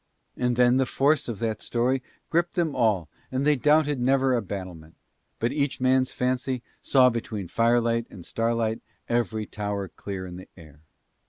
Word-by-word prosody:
And 125 Hz, -1 st, 0 dB
then 125 Hz, +1 st, +4 dB
the 130 Hz, -1 st, +2 dB
force 145 Hz, +3 st, +2 dB
of 115 Hz, -4 st, -4 dB
that 110 Hz, -1 st, -2 dB
story 125 Hz, +2 st, 0 dB, 0.3 s
gripped 170 Hz, +2 st, +1 dB
them 165 Hz, -5 st, 0 dB
all 105 Hz, -9 st, +2 dB, 0.2 s
and 130 Hz, +2 st, -1 dB
they 150 Hz, 0 st, +5 dB
doubted 150 Hz, 0 st, +3 dB
never 135 Hz, +1 st, +3 dB
a 120 Hz, -, +2 dB
battlement, 90 Hz, -5 st, -7 dB, 0.4 s
but 115 Hz, +2 st, 0 dB
each 140 Hz, -1 st, -1 dB
man's 130 Hz, 0 st, +2 dB
fancy 125 Hz, 0 st, -1 dB, 0.2 s
saw 130 Hz, -2 st, +5 dB
between 110 Hz, -4 st, -4 dB
firelight 115 Hz, +2 st, +2 dB
and 90 Hz, -4 st, -11 dB
starlight 115 Hz, -1 st, -1 dB, 0.3 s
every 115 Hz, -2 st, 0 dB
tower 100 Hz, -2 st, -4 dB
clear 95 Hz, -2 st, -6 dB
in 90 Hz, -1 st, -8 dB
the 95 Hz, -, -11 dB
air. 75 Hz, -3 st, -15 dB
120 Hz, 165 wpm, -26 LUFS, 105-130 Hz, 0.4 s, they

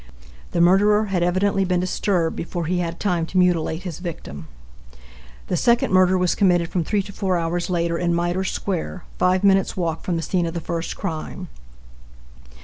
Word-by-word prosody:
The 170 Hz, -, 0 dB
murderer 205 Hz, +4 st, +4 dB
had 180 Hz, -, +1 dB
evidently 190 Hz, +3 st, +1 dB
been 180 Hz, -1 st, +1 dB
disturbed 180 Hz, -2 st, 0 dB
before 170 Hz, 0 st, -4 dB
he 180 Hz, +2 st, 0 dB
had 170 Hz, -1 st, -3 dB
time 175 Hz, -5 st, 0 dB
to 185 Hz, -, -4 dB
mutilate 175 Hz, -2 st, +2 dB
his 175 Hz, -4 st, -6 dB
victim. 170 Hz, -, -7 dB, 1.0 s
The -, -, -2 dB
second 235 Hz, +2 st, +2 dB
murder 185 Hz, 0 st, +5 dB
was 180 Hz, -1 st, +2 dB
committed 175 Hz, -4 st, +2 dB
from 180 Hz, -, -1 dB
three 200 Hz, +4 st, 0 dB
to 200 Hz, -, -10 dB
four 190 Hz, -3 st, 0 dB
hours 170 Hz, +2 st, -2 dB
later, 170 Hz, -1 st, 0 dB
in 175 Hz, -1 st, 0 dB
Mitre 175 Hz, +2 st, 0 dB
square, 185 Hz, -2 st, -3 dB, 0.2 s
five 185 Hz, +1 st, +2 dB
minutes' 195 Hz, -1 st, +3 dB
walk 165 Hz, -3 st, -2 dB
from 180 Hz, -, -1 dB
the 165 Hz, -, -2 dB
scene 175 Hz, -1 st, 0 dB
of 165 Hz, -, -5 dB
the -, -, -1 dB
first 165 Hz, 0 st, -4 dB
crime. 180 Hz, 0 st, -5 dB
180 Hz, 180 wpm, -22 LUFS, 170-190 Hz, 1.0 s, murder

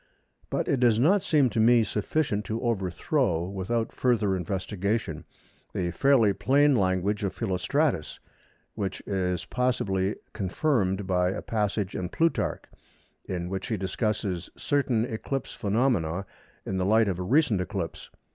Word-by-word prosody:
But -, -, -1 dB
it 135 Hz, -, +1 dB
does 120 Hz, -3 st, +4 dB
not 185 Hz, +10 st, +4 dB
seem 145 Hz, -8 st, +3 dB
to 110 Hz, -, -1 dB
me 115 Hz, +1 st, +5 dB
sufficient 105 Hz, 0 st, -1 dB
to 110 Hz, +1 st, -3 dB
overthrow, 100 Hz, -, 0 dB
without 100 Hz, +4 st, -2 dB
further 110 Hz, -6 st, +1 dB
investigation, 95 Hz, 0 st, -2 dB, 0.5 s
the 85 Hz, -1 st, -1 dB
fairly 115 Hz, +1 st, +4 dB
plain 135 Hz, +8 st, +3 dB
language 100 Hz, 0 st, +1 dB
of 95 Hz, -2 st, -2 dB
Philostratus, 110 Hz, -, 0 dB, 0.5 s
which 100 Hz, -3 st, -4 dB
is 90 Hz, -3 st, -2 dB
possibly 105 Hz, -6 st, 0 dB, 0.2 s
confirmed 100 Hz, -, 0 dB
by 90 Hz, -1 st, +2 dB
a 95 Hz, -, -4 dB
passage 105 Hz, -3 st, -1 dB
in 90 Hz, -2 st, -3 dB
Plutarch 165 Hz, -, 0 dB, 0.6 s
in 90 Hz, -2 st, -3 dB
which 95 Hz, +1 st, -4 dB
he 115 Hz, -4 st, -1 dB
discusses 95 Hz, -2 st, -2 dB
certain 130 Hz, -6 st, +1 dB
eclipse 125 Hz, +2 st, -4 dB
phenomena 100 Hz, -5 st, 0 dB, 0.4 s
in 95 Hz, -, -2 dB
the 90 Hz, -, 0 dB
light 110 Hz, +1 st, +4 dB
of 95 Hz, -2 st, -1 dB
a -, -, -2 dB
recent 120 Hz, -, +2 dB
eclipse. 90 Hz, -, -5 dB
105 Hz, 135 wpm, -27 LUFS, 95-120 Hz, 0.6 s, me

